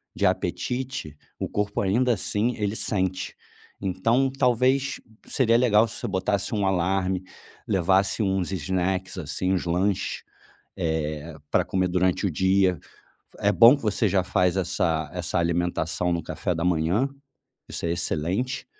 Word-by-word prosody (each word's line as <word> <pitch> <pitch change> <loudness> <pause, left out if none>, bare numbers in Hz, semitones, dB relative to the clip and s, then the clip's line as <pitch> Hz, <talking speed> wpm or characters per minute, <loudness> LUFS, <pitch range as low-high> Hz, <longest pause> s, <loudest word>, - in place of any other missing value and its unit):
de - - 0
apetite, 125 - -2 0.2
o - - -2
corpo, 105 0 -2
ainda 120 +6 +2
assim, 110 +3 -1
ele 105 -1 -1
sente. 95 -4 -2 0.5
Então, 115 +8 +1
talvez, 130 +1 +1 0.3
seria 115 -3 +2
legal 115 -2 +4
se 110 - -9
você - - -3
botasse 100 +2 -1
um 100 -2 0
alarme, 95 0 0 0.4
levasse 95 +2 +2
uns 95 -2 0
snacks, 95 +2 -2
assim, 90 +3 -1
uns 95 - 0
lanches, 90 +3 -1 0.5
eh, 80 -2 -2 0.2
pra - - +3
comer 95 -1 0
durante 90 +2 +1
o 95 - +1
dia. 95 +1 +2 0.6
É 100 - +2
bom 120 +6 +7
que - - -13
você 105 0 +1
já 95 0 +2
faz 90 0 +1
essa 80 -4 0
essa 90 0 -1
alimentação 85 0 0
no 85 - -1
café 90 - -2
da 85 +1 -2
manhã. 90 +8 +2 0.6
Isso - - -4
é 85 - 0
excelente. 85 - -1
95 Hz, 145 wpm, -25 LUFS, 90-105 Hz, 0.6 s, bom